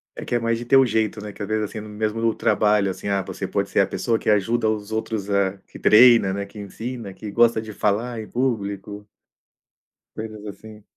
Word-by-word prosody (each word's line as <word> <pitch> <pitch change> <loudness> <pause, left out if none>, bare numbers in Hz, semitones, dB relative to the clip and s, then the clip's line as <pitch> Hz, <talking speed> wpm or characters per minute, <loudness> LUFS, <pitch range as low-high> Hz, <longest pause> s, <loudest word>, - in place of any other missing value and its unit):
É - - -7
que - - -5
é - - +2
mais 115 0 0
de 120 - -7
ter 135 +3 +5
o 135 - +6
jeito, 110 -2 -1
né, 105 - -6
que - - -13
às - - -4
vezes, 110 0 0
assim, 110 - -7
mesmo 110 +2 -1
trabalho, 105 -2 +2
assim, 95 - -6
ah, 100 -1 +1
você 95 0 -5
pode 100 +1 -1
ser 100 - +3
a - - +2
pessoa 115 -2 -1
que - - -2
ajuda 110 +3 +2
os 105 -1 -3
outros 110 -2 -3
a 100 -1 +1
que - - -12
treina, 115 -3 +6
né, 100 0 -3
que 100 +2 -15
ensina, 110 +1 -6
que 105 - -8
gosta 115 +1 +3
de 110 -1 -8
falar 110 +4 -1
em 110 - -7
público 105 -4 -3 1.1
coisas 110 -1 -7
assim. 105 +1 -10
105 Hz, 220 wpm, -23 LUFS, 100-115 Hz, 1.1 s, o